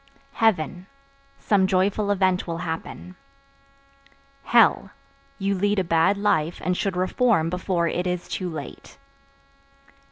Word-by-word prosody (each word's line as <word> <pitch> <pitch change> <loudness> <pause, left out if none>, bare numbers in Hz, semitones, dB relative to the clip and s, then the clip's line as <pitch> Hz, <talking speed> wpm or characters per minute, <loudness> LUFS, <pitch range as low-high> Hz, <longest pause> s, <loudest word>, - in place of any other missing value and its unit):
Heaven 185 -4 0 0.5
Some 195 -3 +2
joyful 200 +2 +1
event 185 -3 +1
will 165 -1 -3
happen. 165 +2 -6 1.3
Hell - - +4 0.5
You 200 0 -1
lead 205 +2 0
a 190 - +2
bad 165 +3 +2
life 175 -5 0
and 180 0 +1
should 190 0 -2
reform 185 -2 +1
before 180 -1 -1
it 180 +2 -2
is 180 -1 -3
too 185 -2 -4
late. 155 -4 -9
185 Hz, 120 wpm, -24 LUFS, 170-200 Hz, 1.3 s, Hell